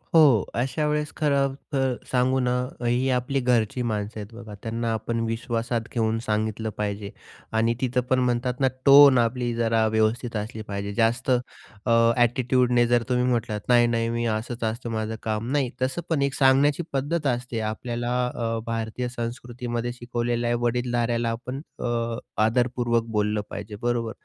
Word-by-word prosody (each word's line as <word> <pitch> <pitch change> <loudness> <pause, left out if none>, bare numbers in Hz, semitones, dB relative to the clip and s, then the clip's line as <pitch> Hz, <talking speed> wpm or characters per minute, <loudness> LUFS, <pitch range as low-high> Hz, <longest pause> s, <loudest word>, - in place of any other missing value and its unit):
हो, 140 -10 +7
अशा 135 +6 0
वेळेस 150 0 -1
खरंतर 140 -2 0 0.2
सांगू 130 +1 +2
ना, 125 -1 +1 0.3
अ, 120 - -5
ही 125 +2 +1
आपली 125 +2 0
घरची 125 -1 +1
माणसं 110 -1 -2
आहेत 105 +2 -9
बघा. 115 -2 -10
त्यांना 115 0 -2
आपण 115 +1 -2
विश्वासात 115 0 -2
घेऊन 115 -1 +1
सांगितलं 110 +1 -1
पाहिजे 100 -1 -3 0.4
आणि 115 +1 +2
तिथं 125 0 +1
पण 130 - +3
म्हणतात 125 0 0
ना 135 - +4 0.2
टोन 140 -1 +9
आपली 120 +1 +1
जरा 115 -1 +2
व्यवस्थित 110 +2 0
असली 110 +2 -5
पाहिजे. 100 0 -4
जास्त 115 +3 +1 0.5
अ, 115 -1 +4
ॲटिट्यूडने 125 0 +3
जर 120 -1 +3
तुम्ही 125 0 +2
म्हटलात, 115 -4 0
"नाही-नाही 120 -1 +3
मी 115 0 -1
असंच 115 +2 -3
असतं 115 +2 -2
माझं 110 0 -2
काम." 110 +1 -2
नाही 140 -3 +1
तसं 130 +6 0
पण 160 -4 +1
एक 140 -1 +1
सांगण्याची 140 +4 +4
पद्धत 145 +3 0
असते. 125 -2 -2
आपल्याला 120 +2 -3 0.2
अ, 115 -1 -1
भारतीय 115 +2 -3
संस्कृतीमध्ये 120 0 -4
शिकवलेलं 120 0 -2
आहे, 120 - +2
वडीलधाऱ्याला 120 -1 0
आपण 125 +4 -5 0.2
अ, 115 -1 -1 0.3
आदरपूर्वक 120 0 +1
बोललं 105 0 +1
पाहिजे 105 - -7
बरोबर. 120 -2 0
120 Hz, 155 wpm, -25 LUFS, 115-125 Hz, 0.5 s, टोन